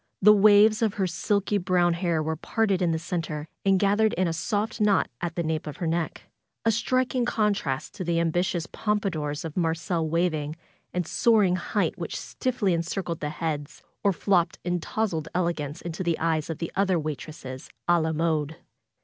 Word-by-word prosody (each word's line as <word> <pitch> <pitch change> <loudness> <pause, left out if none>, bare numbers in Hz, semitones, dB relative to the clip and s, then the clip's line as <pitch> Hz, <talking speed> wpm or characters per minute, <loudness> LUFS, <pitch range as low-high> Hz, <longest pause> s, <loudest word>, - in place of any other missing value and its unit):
The 210 +2 +8
waves 210 +1 +6
of 220 -3 +1
her 195 - +1
silky 200 +3 0
brown 180 -1 +2
hair 170 -2 0
were 160 +1 -1
parted 195 +3 0
in 175 - +2
the 160 - +1
center 160 -2 -4 0.2
and 195 -1 +4
gathered 205 +3 +3
in 185 0 +1
a 165 - -1
soft 210 +6 -2
knot 210 -2 +3
at 170 -1 -3
the 170 - -1
nape 160 -1 -2
of 150 - -6
her 175 - -3
neck; 165 0 -2 0.4
a 225 - +5
striking 255 +3 +1
contrast 210 - 0
to 190 - -5
the 170 -1 +1
ambitious 170 +1 0
pompadours 180 -9 -2
of 160 - -6
marcel 165 -1 0
waving 155 -3 0 0.4
and 180 -1 -1
soaring 205 -1 +3
height 185 0 -1
which 170 - -4
stiffly 240 -7 -1
en 165 - +1
circled 170 -1 -3
the 150 - -2
heads, 150 -1 -4 0.2
or 200 - +4
flopped 180 -2 +1
in 175 0 0
towzled 170 -4 -2
elegance 165 -4 -1
into 170 +1 -5
the 170 -3 0
eyes 160 -2 0
of 165 - -3
the 165 - -4
other 190 -2 +2
waitresses, 150 -3 -6 0.2
a 175 -1 +4
la 160 0 0
mode. 160 -1 0
175 Hz, 185 wpm, -26 LUFS, 160-200 Hz, 0.4 s, The